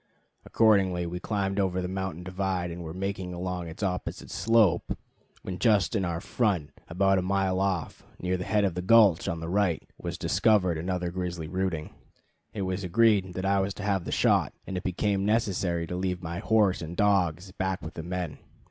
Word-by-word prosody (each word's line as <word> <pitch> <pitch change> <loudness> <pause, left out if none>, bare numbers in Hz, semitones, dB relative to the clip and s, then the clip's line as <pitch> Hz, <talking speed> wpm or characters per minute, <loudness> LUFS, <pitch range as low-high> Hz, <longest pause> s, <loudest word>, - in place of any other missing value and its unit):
Accordingly, 95 -6 +3
we 90 +1 -4
climbed 100 0 -1
over 95 -2 +1
the 90 - -2
mountain 95 -2 -4
divide 90 -1 -2
and 85 +1 -7
were 80 - -6
making 95 0 -4
along 90 -1 -3
its 80 +5 -7
opposite 90 -2 -3
slope, 105 -2 +2 0.5
when 90 -1 -5
just 110 -2 +3
in 100 - +1
our 85 -1 -2
front 95 -8 0 0.2
about 95 +3 +2
a - - 0
mile 95 0 0
off, 95 -4 -1 0.2
near 90 +1 0
the 90 - -3
head 105 +2 +1
of 95 - 0
the 90 - -3
gulch 100 -3 +5
on 85 0 -2
the 80 - -4
right, 95 -2 0
was - - -4
discovered 95 -4 +2
another 90 0 -2
grizzly 90 -3 -4
rooting. 90 -3 -2 0.6
It 100 - -4
was 95 +1 -2
agreed 95 -1 +3
that 95 - -3
I 100 0 +3
was 95 0 -1
to 105 - -7
have 100 -4 0
the - - -4
shot, - - +2
and 95 - -5
it 90 - -2
became 95 +1 0
necessary 95 -6 0
to 90 - -5
leave 90 0 -2
my 85 +1 -4
horse 105 -4 +2
and 85 +1 -6
dogs 95 -3 +2
back 95 0 -2
with 80 +1 -7
the - - -6
men. 90 -2 -4
95 Hz, 195 wpm, -28 LUFS, 90-100 Hz, 0.6 s, gulch